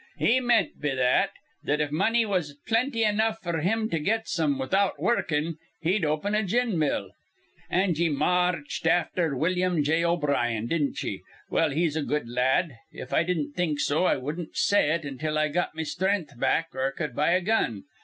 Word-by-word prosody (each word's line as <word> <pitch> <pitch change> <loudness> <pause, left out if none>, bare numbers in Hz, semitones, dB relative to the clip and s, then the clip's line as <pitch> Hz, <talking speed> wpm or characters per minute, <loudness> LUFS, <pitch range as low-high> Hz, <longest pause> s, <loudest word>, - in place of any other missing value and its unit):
He 250 +3 +3
meant 240 -2 +1
be 145 -2 -1
that, 125 -1 +3 0.3
that 150 +1 0
if 150 -1 -1
money 225 +9 +2
was 180 -8 -2
plenty 230 +1 +1
enough 220 +1 +1
f'r 170 -3 -2
him 220 +6 +1
to 165 - 0
get 220 +8 0
some 150 -5 0
without 190 +9 0
wurrukin', 165 -8 0 0.2
he'd 180 +3 +1
open 155 +7 0
a 215 - +3
gin 220 -1 0
mill. 150 -2 -1 0.6
An' 185 0 +2
ye 165 +1 +1
ma 180 +5 +2
arched 160 0 -5
afther 165 -2 +1
Willum 180 +1 +1
J. 160 +3 +1
O'Brien, 140 -10 0
didn't 140 0 -1
ye? 100 -7 -4 0.3
Well, 165 - +2
he's 155 +1 0
a 160 - 0
good 150 -3 -2
la 120 +1 -2
ad. 145 +6 +2 0.2
If 125 - -8
I - - +4
didn't 170 -4 -1
think 155 -2 -1
so, 150 +6 +1
I - - +3
wudden't 150 +5 -6
say 200 -7 +3
it 165 0 -1
until 150 +3 -3
I 155 0 +2
got 175 +1 -1
me 160 - -2
strenth 190 0 -1
back 160 +5 +1
or 130 +1 -1
cud 150 -5 -4
buy 150 +4 +2
a 185 - +2
gun. 175 - 0
165 Hz, 195 wpm, -26 LUFS, 145-185 Hz, 0.6 s, I